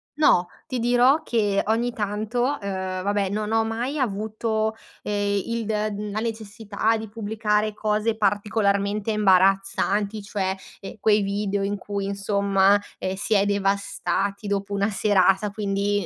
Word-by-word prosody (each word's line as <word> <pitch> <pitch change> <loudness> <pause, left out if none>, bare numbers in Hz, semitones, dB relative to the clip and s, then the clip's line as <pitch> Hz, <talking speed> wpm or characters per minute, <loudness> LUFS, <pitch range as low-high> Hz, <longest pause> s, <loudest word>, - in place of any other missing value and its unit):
no, 180 - +4 0.2
ti 255 -2 -3
dirò 245 +5 +4
che, 205 -4 +1
ogni 235 +2 +1
tanto, 215 +3 -2
uhm, 190 -8 -2
vabbè 200 -1 0
non 210 +1 -2
ho 225 0 +3
mai 235 +6 -3
avuto, 220 -1 -1 0.3
eh, 205 -1 0
il 230 -1 -3
d 210 -1 -2
la 215 - -2
necessità 220 -1 -2
di 220 0 -6
pubblicare 215 -1 -1
cose 215 +1 0
particolarmente 205 0 +1
imbarazzanti, 195 +1 +2
cioè, 195 -2 -2 0.3
ehm, 195 - -8
quei 210 0 +3
video 200 0 -1
in 205 +1 -1
cui 200 0 -4
insomma, 200 0 +2 0.2
ehm, 185 0 -2
si 205 +3 -1
è 200 0 +4
devastati 200 0 -1
dopo 200 0 -2
una 200 +1 +1
serata, 200 -1 +3
quindi, 205 -1 -1
205 Hz, 140 wpm, -24 LUFS, 200-220 Hz, 0.3 s, no